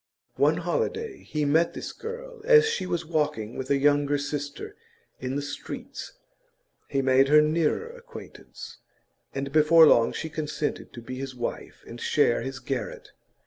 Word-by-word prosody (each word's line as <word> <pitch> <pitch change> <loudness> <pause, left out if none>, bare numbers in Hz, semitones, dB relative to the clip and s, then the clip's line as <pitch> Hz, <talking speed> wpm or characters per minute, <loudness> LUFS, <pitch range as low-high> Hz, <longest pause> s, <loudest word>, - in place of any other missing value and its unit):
One - - +3
holiday 455 -3 -2
he 150 -1 -2
met 160 +4 +2
this - - -5
girl 480 +1 -8
as 455 -1 +6
she 445 - -2
was 175 -2 -2
walking 145 -9 -1
with 130 0 -5
a 140 - +3
younger 145 0 +3
sister 145 0 -5 0.4
in 130 +1 -3
the 145 - -2
streets; 145 0 -7 0.7
he 135 -2 -1
made 130 +1 +4
her 150 +2 +7
nearer 160 - +1
acquaintance, 485 0 -11 0.6
and 135 0 -3
before 155 +2 +7
long 115 -6 +5
she - - -4
consented 150 -1 -4
to 120 - -9
be 130 +2 -6
his 135 -1 -6
wife 120 - -6
and 120 +1 -10
share 145 -5 +2
his 135 0 -5
garret. 130 -1 -5
145 Hz, 155 wpm, -26 LUFS, 135-170 Hz, 0.7 s, her